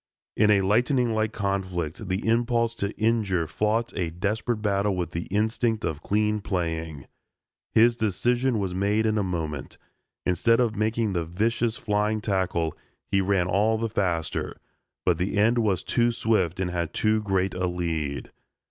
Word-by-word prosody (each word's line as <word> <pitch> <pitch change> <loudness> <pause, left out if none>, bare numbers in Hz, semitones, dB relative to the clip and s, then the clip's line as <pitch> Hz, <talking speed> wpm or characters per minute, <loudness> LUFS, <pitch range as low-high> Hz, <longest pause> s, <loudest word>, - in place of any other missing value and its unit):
In 105 0 +4
a 100 -2 +5
lightning 120 +4 +2
like 110 0 0
conflict, 95 -3 -3
the 95 +4 -2
impulse 115 0 +2
to 100 -3 -2
injure 110 -6 +1
fought 110 +7 -1
a 90 -3 -1
desperate 105 +7 -1
battle 100 -1 +1
with 85 -2 -3
the 85 0 -4
instinct 110 +2 0
of 75 -1 -3
clean 105 +2 +1
playing. 80 -6 -3 0.6
His 115 +1 +4
decision 120 +4 +1
was 95 -3 -2
made 100 +4 +1
in 110 -1 +2
a - - +1
moment. 80 -7 -4 0.5
Instead 115 +6 +3
of 115 -3 +1
making 110 0 0
the 85 -2 0
vicious 110 +7 0
flying 105 +1 0
tackle, 95 -6 -1 0.4
he 100 - +3
ran 95 -2 +2
all 105 +5 +2
the 115 +1 -2
faster, 90 -6 -2 0.5
but - - +2
the 95 +4 -1
end 115 +4 +4
was 100 -5 +1
too 120 0 +2
swift 105 -7 0
and 90 -2 -1
had 85 -2 -3
too 110 0 +2
great 95 -2 0
a 90 0 -1
lead. 80 -5 -3
100 Hz, 160 wpm, -26 LUFS, 90-110 Hz, 0.6 s, a